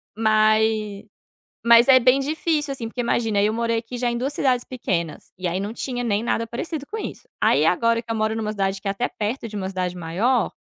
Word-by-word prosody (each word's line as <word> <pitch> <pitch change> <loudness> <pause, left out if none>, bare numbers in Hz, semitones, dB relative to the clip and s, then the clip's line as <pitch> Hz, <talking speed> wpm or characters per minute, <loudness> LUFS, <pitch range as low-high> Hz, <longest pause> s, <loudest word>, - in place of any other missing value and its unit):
Mas 215 -1 +2 0.6
mas 235 0 +7
é 260 -1 +8
bem 255 +2 +4
difícil, 300 +1 -1
assim, 235 -4 -5
porque 245 +2 -4
imagina 225 -3 +1
eu 210 +1 +2
morei 230 0 0
aqui 230 +2 -8
já 245 0 0
em - - -2
2 265 +4 -2
cidades 255 -4 +1
pequenas, 175 -10 -4
e 185 0 -3
aí 175 +2 -1
,não 205 +3 -4
tinha 245 0 -4
nem 210 -3 0
nada 230 -1 0
parecido 285 +6 -5
com 425 - -7
isso. 445 +2 -6
Aí, 145 +3 +4
agora 230 +7 +2
que 230 - -6
eu - - -1
moro 220 0 0
em - - -3
uma 215 -1 -2
cidade 195 -2 -1
que 200 - -6
é - - +2
até 220 +5 -1
perto 225 +3 -3
de 215 - -9
uma 190 -2 -3
cidade 180 -1 -3
maior 195 +9 0
225 Hz, 230 wpm, -23 LUFS, 205-245 Hz, 0.6 s, é